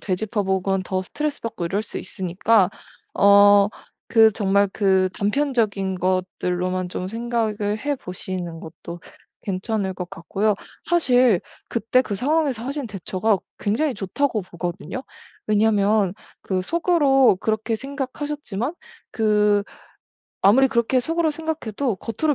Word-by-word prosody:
되짚어보건 195 -1 -1
더 185 0 -2
스트레스받고 230 - -4
이럴 200 +4 -1
수 - - -7
있으니까 190 +1 +1 0.4
어 200 0 +6 0.4
그 225 -1 +6
정말 200 0 +2
그 190 -2 +2
단편적인 210 -4 0
것들로만 185 0 -1
좀 185 +1 -4
생각을 220 -2 -1
해보시는 185 - -4
것도 170 +1 -9 0.4
괜찮을 195 0 -2
것 180 -1 -6
같고요. 195 +6 -1 0.3
사실 255 - +3 0.3
'그때 235 +2 +2
그 210 -5 -3
상황에서 275 0 0
하신 280 0 -3
대처가 200 +1 0 0.2
굉장히 255 +8 0
좋다.'고 225 +3 -1
보거든요. 175 - -5 0.4
왜냐면 210 -2 +2 0.3
그 185 -1 -2
속으로 285 - +3
그렇게 220 +1 -1
생각하셨지만 275 -2 -4 0.4
그 210 -2 +3 0.8
아무리 250 +8 +6
그렇게 255 0 +1
속으로 325 +5 0
생각해도 285 -7 -3
겉으로 295 - -1
210 Hz, 285 characters per minute, -22 LUFS, 190-255 Hz, 0.8 s, 어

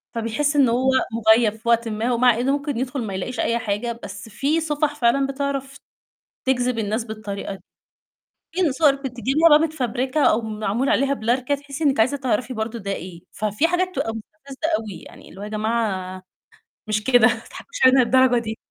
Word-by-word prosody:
فبيحس 230 +6 -1
إنه 265 -5 +4
هو 260 +2 +2 0.2
مُغيّب 220 -1 +4
في 230 +2 -5
وقتٍ 235 0 +3
ما، 225 +3 -1
ومع 240 -1 +3
إنه 260 +3 +1
ممكن 280 -2 -2
يدخل 260 +2 -3
ما 200 - -5
يلاقيش 225 +6 -4
أي 235 0 +1
حاجة، 230 +1 -3
بس - - -8
في 280 +9 0
صفح 300 -1 -1
فعلًا 270 +1 +2
بتعرف 275 0 -3 0.7
تجذب 250 -2 0
الناس 220 +2 -1
بالطريقة 210 -3 -6
دى. 190 - -13 0.9
في 350 -5 +1
صور 285 0 +4
بتجيبيها 270 +4 +1
بقى 300 -1 +7
متفبركة 270 -2 -1
أو 220 - +4
معمول 220 +3 -2
عليها 275 +1 +2
blur 240 +1 0
كده 285 +2 0
تحسّي 285 +2 -6
إنِك 275 -5 +2
عايزة 260 +6 +3
تعرفي 255 -1 -1
برضه 220 +1 -4
ده 200 -2 -5
إيه، 175 -3 -7
ففي 215 +9 0
حاجات 365 +1 0
تبقى 225 - -1
مستفزة 265 +7 -7
أوي، 205 -6 -8
يعني - - -14
اللي 195 - -13
هو - - -5
يا - - -6
جماعة 210 -4 -2 0.7
مش 210 0 -1
كده 245 -2 +5
ما 240 - +2
تضحكوش - - -10
علينا 260 +1 +6
للدرجة 255 0 +4
دي. 220 -1 -5
245 Hz, 185 wpm, -22 LUFS, 220-275 Hz, 0.9 s, بقى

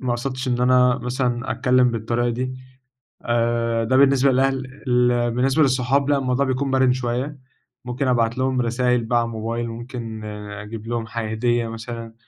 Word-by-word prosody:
ما 130 - -2
اقصدتش 130 +2 -3
إن 120 0 0
أنا 125 0 +4
مثلًا 125 0 -2
اتكلّم 125 +2 +3
بالطريقة 115 +1 -1
دي، 130 +2 -3 0.7
آآ 115 -1 0
ده 130 +3 +2
بالنسبة 135 0 +5
للأهل 135 0 -1
ال 120 -1 +2
بالنسبة 135 +5 +2
للصحاب 135 +1 +1
لأ 145 - +3
الموضوع 135 0 0
بيكون 130 +1 -1
مَرن 130 -1 +3
شوية، 130 +3 -3 0.5
ممكن 125 +2 -2
ابعت 120 -1 +1
لهم 130 -1 +1
رسايل 125 0 +1
بقى 120 +1 +1
على 115 - 0
الموبايل 115 +1 -3
وممكن 115 -2 -7 0.3
أجيب 105 +2 -8
لهم 115 -1 -3
حا 115 -1 -4
هدية 120 +1 0
مثلًا، 115 0 -7
125 Hz, 160 wpm, -22 LUFS, 115-130 Hz, 0.7 s, بالنسبة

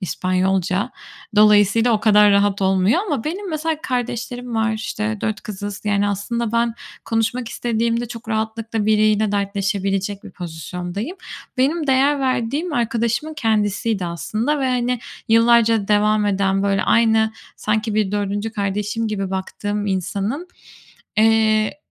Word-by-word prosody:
İspanyolca. 185 +3 0 0.5
Dolayısıyla 210 +2 +5
o 215 - +1
kadar 210 -1 +6
rahat 200 0 +2
olmuyor 190 - +3
ama 290 - -2
benim 370 +5 -4
mesela 315 0 -1
kardeşlerim 245 -3 -3
var, 225 0 +1
işte, 220 0 -3
4 220 -1 -2
kızız. 205 -1 -6
Yani 205 -1 +1
aslında 225 +3 -2
ben 235 0 +1 0.3
konuşmak 225 +2 -1
istediğimde 235 0 -1
çok 230 0 -9
rahatlıkla 220 0 -2
biriyle 215 -1 +3
dertleşebilecek 200 0 -1
bir - - -9
pozisyondayım. 180 - -6 0.4
Benim 300 +5 +1
değer 275 +2 +3
verdiğim 265 +6 -1
arkadaşımın 235 +4 -1
kendisiydi 215 -4 0
aslında 220 - -2
ve, 265 - +1
hani, 250 0 0 0.3
yıllarca 230 -2 +4
devam 210 0 +3
eden, 195 -1 +1
böyle, 195 -1 +1
aynı, 230 -1 +3 0.4
sanki 215 0 -1
bir 210 -2 +1
4'üncü 205 +1 -2
kardeşim 210 +2 -2
gibi 195 -3 -3
baktığım 205 +2 -3
insanın, 200 - -2 0.7
eee, 220 +1 +3
215 Hz, 125 wpm, -20 LUFS, 200-235 Hz, 0.7 s, kadar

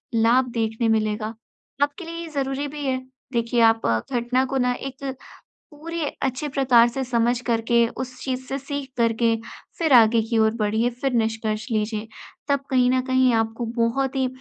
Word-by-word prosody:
लाभ 235 +3 +4
देखने 225 +1 0
मिलेगा। 215 0 -2 0.5
आपके 290 +5 -3
लिए 335 0 -7
ये 335 - -6
ज़रूरी 275 -1 -2
भी 290 0 -6
है 260 -1 +1 0.4
देखिए 235 0 +1
आप 225 0 +4 0.3
घटना 250 +2 +1
को 270 +1 -2
ना 250 -1 +2
एक 270 +1 -6 0.6
पूरे 330 +2 -5 0.2
अच्छे 270 +2 -1
प्रकार 255 -4 +4
से 265 +3 -3
समझ 240 -1 +1
करके 235 0 +2
उस 255 0 -6
चीज़ 260 -1 -3
से 270 - -2
सीख 280 0 -5
करके 230 0 +2 0.4
फिर 320 -4 +2
आगे 230 -1 +6
की 225 +1 -1
ओर 220 0 +4
बढ़िए 220 +2 +1
फिर 270 -2 0
निष्कर्ष 220 -1 -1
लीजिए। 215 0 -1 0.4
तब 280 0 +3
कहीं 250 -2 +3
न 255 0 +2
कहीं 260 -1 +3
आपको 225 +1 -1
बहुत 255 +4 0
ही 265 -1 +1
245 Hz, 170 wpm, -23 LUFS, 225-270 Hz, 0.6 s, आगे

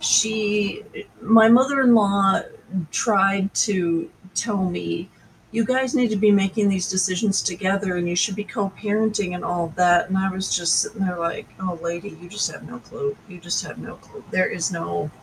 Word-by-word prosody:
she 210 -1 +1
eh, - - -8 0.2
my 225 +1 +6
mother-in-law 235 -7 +4 0.5
tried 195 -2 +2
to 170 -5 0 0.2
tell 205 -5 -1
me, 85 - -5 0.4
"You 225 0 0
guys 260 +1 0
need 250 -4 +3
to 215 - -1
be 210 +1 +4
making 200 +1 +2
these 190 -2 -1
decisions 190 +2 +1
together, 190 0 -1
and 175 0 -1
you 175 - -2
should 190 +2 +1
be 210 - -4
co-parenting 205 -1 -2
and 180 - -7
all 170 -2 -3
that," 175 -1 +4
and 190 - 0
I 190 0 +1
was 190 +1 -2
just 175 -2 +2
sitting 215 - -5
there 180 -2 -2
like, 170 0 -3
"Oh, 185 -2 -4
lady, 170 +1 -5
you 175 - -13
just 210 +2 -2
have - - -11
no - - -11
clue. 425 -1 -6
You 180 -3 -13
just 175 +1 -2
have - - -10
no - - -10
clue. 435 - -16
There 185 - +2
is 170 +1 -2
no" 85 - -4
195 Hz, 185 wpm, -22 LUFS, 180-215 Hz, 0.5 s, my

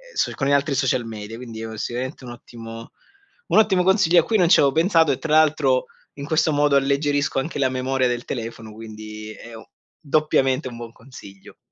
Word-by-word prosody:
so - - 0
con 135 - -2
gli - - +1
altri 140 0 +2
social 130 -2 0
media. 110 0 -8
Quindi 115 -3 -9
è 110 0 -7
sicuramente 130 +5 -5
un 120 - -8
ottimo 115 -1 -11 0.6
un - - +4
ottimo 190 -4 +3
consiglio 180 -3 +4
a - - -8
cui 220 +4 0
non 175 -3 +3
c'avevo 140 -5 +5
pensato, 165 -1 +3
e 130 - -2
tra 155 -1 -2
l'altro 150 -4 +3 0.3
in 140 - -6
questo 155 0 +1
modo 145 -1 +2
alleggerisco 140 +1 0
anche 145 +1 -4
la 130 - +2
memoria 130 0 0
del 120 0 -3
telefono, 115 -2 -6
quindi 110 -1 -9
è 115 - -13 0.5
doppiamente 145 -3 +1
un 120 - -10
buon 115 -1 -8
consiglio. 110 -6 -15
135 Hz, 190 wpm, -22 LUFS, 115-155 Hz, 0.6 s, c'avevo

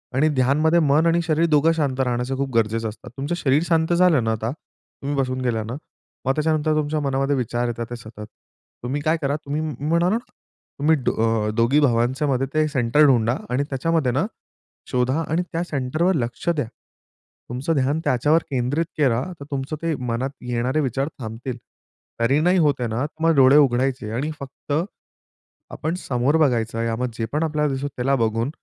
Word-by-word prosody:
आणि 150 +4 +3
ध्यानमध्ये 150 +6 +3
मन 155 +1 +3
आणि 170 +1 +3
शरीर 160 +1 +2
दोघं 150 +2 +4
शांत 140 -4 -1
राहण्याचं 125 +1 -1
खूप 140 0 -1
गरजेचं 115 0 +1
असतं. 105 - -12
तुमचं 145 +5 -2
शरीर 145 +1 +2
शांत 165 0 +2
झालं 170 -8 +4
ना 110 - 0
आता. 110 +1 -2
तुम्ही 145 0 -8
बसून 130 -1 -1
गेला 115 -3 0
ना 115 +3 -6 0.5
मग 135 - +2
त्याच्यानंतर 155 0 +1
तुमच्या 155 0 0
मनामध्ये 135 0 0
विचार 120 -1 -1
येतात 115 0 -3
ते 120 - -5
सतत. 110 -2 -10 0.6
तुम्ही 135 +4 -2
काय 155 +2 +1
करा, 140 0 0
तुम्ही 145 +2 -2 0.3
म्हणा 170 +2 +3
ना 220 - +2 0.6
तुम्ही 155 +3 +4
अ, 115 -4 0
दोघी 120 +5 +3
भावांच्यामध्ये 130 +1 +1
ते 155 0 +2
सेंटर 145 +1 +3
ढुंडा 120 -3 +3
आणि 125 +3 +1
त्याच्यामध्ये 140 0 0
ना 145 +8 +1 0.7
शोधा 130 +5 +1
आणि 160 +3 +1
त्या 165 0 -1
सेंटरवर 155 +4 0
लक्ष 120 +2 -3
द्या. 150 -6 0 0.8
तुमचं 130 +7 -1
ध्यान 140 +3 +1
त्याच्यावर 150 +4 +2
केंद्रित 135 +5 0
करा. 130 -5 +2 0.2
तर 140 - -8
तुमचं 140 +2 -3
ते 165 -1 0
मनात 120 +4 -1 0.2
येणारे 125 +5 0
विचार 135 +1 -1
थांबतील. 120 +2 -5 0.6
तरी 130 +5 +3
नाही 180 +4 +3
होत 150 -3 +4
आहे 120 - -1
ना 120 +6 -1
तर 160 +1 -8
मग 165 - +5
डोळे 135 +1 +7
उघडायचे 130 -4 +2
आणि 145 +6 -2
फक्त 140 +1 -10 1.0
आपण 160 +2 -3
समोर 135 +5 +2
बघायचं. 115 -6 +1
या 115 -1 -1
मग 125 +2 -2
जे 115 - -1
पण 155 +2 +1
आपल्याला 150 -2 0
दिसतो 135 +2 -2
त्याला 135 0 0
बघून 115 +1 0
135 Hz, 180 wpm, -22 LUFS, 120-155 Hz, 1.0 s, डोळे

